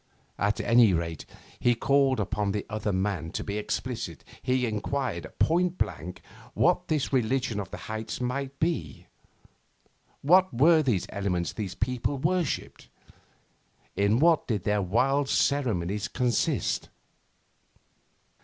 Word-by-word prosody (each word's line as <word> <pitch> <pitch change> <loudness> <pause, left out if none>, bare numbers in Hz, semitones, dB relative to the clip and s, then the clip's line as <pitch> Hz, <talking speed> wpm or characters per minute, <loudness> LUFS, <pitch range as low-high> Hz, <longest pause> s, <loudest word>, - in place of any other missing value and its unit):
At 100 +1 +1
any 115 -4 +5
rate, 85 -2 -3 0.3
he 120 0 +3
called 135 +1 +2
upon 105 0 -1
the 105 - -3
other 105 -1 -1
man 95 -3 -1
to - - -3
be 105 +1 -3
explicit. 110 - -4 0.2
He 130 0 +1
enquired 110 -2 -2
point 175 +2 +2
blank 90 +5 -4 0.3
what - - +2
this 150 -3 -1
religion 125 -3 +1
of 95 -2 -5
the - - -7
heights 110 0 -5
might 135 +2 -3
be. 95 - -2 1.2
What 185 +6 +5
were 160 +2 +6
these 120 - 0
elements 90 -4 -2
these 100 -5 -5
people 125 +2 -1
worshipped? 170 +2 -2 1.1
In 100 +2 +2
what 165 +3 +3
did 105 -7 -1
their 105 -1 +1
wild 135 +9 +1
ceremonies 105 -7 +1
consist? 125 -3 0
115 Hz, 125 wpm, -27 LUFS, 100-140 Hz, 1.2 s, were